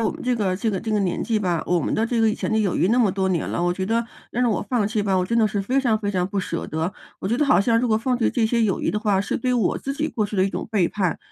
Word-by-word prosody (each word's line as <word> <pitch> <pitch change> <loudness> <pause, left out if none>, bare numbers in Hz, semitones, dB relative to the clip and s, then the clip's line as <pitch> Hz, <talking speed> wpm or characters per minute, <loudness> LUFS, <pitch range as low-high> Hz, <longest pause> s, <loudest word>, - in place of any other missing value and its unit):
我 225 - +1
们 - - -6
这 250 -1 0
个 195 -4 0
这 220 +4 -1
个 195 - -2
这 220 - -7
个 210 -1 +1
年 185 -3 -1
纪 230 - 0
吧， 180 -6 0
我 175 -1 +2
们 - - -2
的 225 - +1
这 235 -1 0
个 225 -1 +4
以 - - -1
前 - - -3
的 - - +2
友 205 -4 +1
谊 - - +2
那 225 +5 +2
么 235 -5 +4
多 190 0 -1
年 180 -3 -1
了， - - -2
我 175 0 +1
觉 185 +1 -3
得 225 +4 0 0.3
要 240 - -2
让 250 - +3
我 215 - 0
放 235 -5 +2
弃 210 0 -1
吧， 195 -2 +1
我 180 0 +1
真 230 - 0
的 220 -2 +4
是 205 0 -2
非 255 +8 +1
常 235 -5 +1
非 205 -1 -2
常 180 -2 +1
不 200 - -3
舍 170 -3 -3
得。 160 +4 -2 0.3
我 - - -5
觉 225 +5 +1
得 295 - +2
好 270 - +4
像 230 +3 +2
如 250 - 0
果 220 -1 +3
放 250 +2 0
弃 235 - +1
这 230 -3 +1
些 235 +1 +1
友 205 -4 +1
谊 - - -1
的 210 - 0
话， 205 -3 +2
是 200 - -2
对 250 +1 -1
我 240 -3 +1
自 275 - -4
己 300 +2 -2
过 215 - -1
去 205 0 -5
的 185 - +3
一 - - +1
种 - - -5
背 200 -6 +2
叛。 185 -3 -1
215 Hz, 385 characters per minute, -23 LUFS, 190-230 Hz, 0.3 s, 个